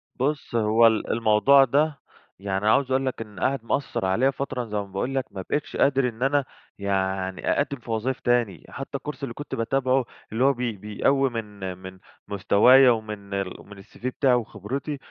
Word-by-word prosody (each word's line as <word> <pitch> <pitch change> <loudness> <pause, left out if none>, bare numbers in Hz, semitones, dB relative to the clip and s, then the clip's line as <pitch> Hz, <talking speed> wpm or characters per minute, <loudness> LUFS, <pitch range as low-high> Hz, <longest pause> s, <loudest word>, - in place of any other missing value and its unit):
بص 140 -1 -2
هو 115 +1 +5
ال 110 -1 0
الموضوع 115 +5 +5
ده، 145 +3 +1 0.4
يعني 95 +1 -2
عاوز 130 +4 +3
أقول 135 +1 +1
لك 130 -3 -3
إن 105 -3 -9
قعد 135 -3 0
مأثر 130 -5 -1
عليّا 115 +9 +2
فترة 130 -3 -4
زي 105 -2 -4
ما 100 - -1
باقول 100 +7 -4
لك، 135 - 0
ما 95 - -6
بقيتش 145 - -2
قادر 135 -2 +3
إن 115 +1 -6
أنا 140 0 +2 0.3
يعني 95 -1 -1
أقدم 140 -1 -1
في 120 - -8
وظايف 115 +4 -1
تاني، 120 -7 0
حتى 140 0 -5
الكورس 150 +1 -8
اللي 125 -4 -4
كنت 145 +4 -6
باتابعه، 130 +2 +1 0.3
اللي 115 +3 0
هو 140 +1 +5
بي 125 -2 -2
بيقوّي 135 +7 +1
من 105 -5 -6
من 95 0 -11 0.3
مستوايا 115 +6 +5
ومن 105 -3 -4 0.3
ومن 100 -1 -13
الCV 120 - -14
بتاعي 130 0 +2
وخبرتي، 120 - -4
120 Hz, 180 wpm, -25 LUFS, 105-135 Hz, 0.4 s, هو